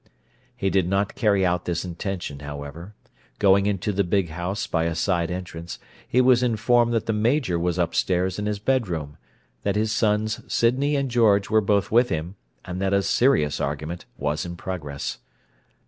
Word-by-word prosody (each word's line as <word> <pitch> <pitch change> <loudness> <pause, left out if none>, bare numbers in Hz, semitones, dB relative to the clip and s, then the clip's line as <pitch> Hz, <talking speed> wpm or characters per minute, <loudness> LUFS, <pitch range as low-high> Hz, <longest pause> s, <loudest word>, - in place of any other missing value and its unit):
He 95 - -1
did 95 -3 +2
not 100 +1 0
carry 100 -5 +2
out 90 0 0
this 85 0 -2
intention, 90 -4 -5
however. 75 +6 -8 0.4
Going 100 0 +4
into 105 0 -1
the 100 0 +1
big 95 -1 0
house 90 +5 -3
by 80 0 0
a 85 0 -1
side 85 -1 0
entrance, 85 -2 -6 0.3
he 125 - +3
was 125 -1 +5
informed 120 0 +2
that 115 - 0
the 110 - 0
Major 110 - +1
was 90 0 -1
upstairs 90 +2 0
in 105 - -2
his 105 -1 -1
bedroom, 95 - -1 0.4
that 100 - -1
his 110 +1 +1
sons 110 0 +1
Sydney 135 +5 +2
and 140 -2 -1
George 105 -4 +3
were 110 0 +5
both 100 -1 +1
with 120 +2 +4
him, 80 +4 -3 0.3
and 90 +1 -5
that 95 0 +1
a 100 0 +3
serious 85 - +2
argument 75 +4 -4
was 75 +1 -1
in 85 0 -6
progress. 80 -6 -5
95 Hz, 175 wpm, -24 LUFS, 85-110 Hz, 0.4 s, was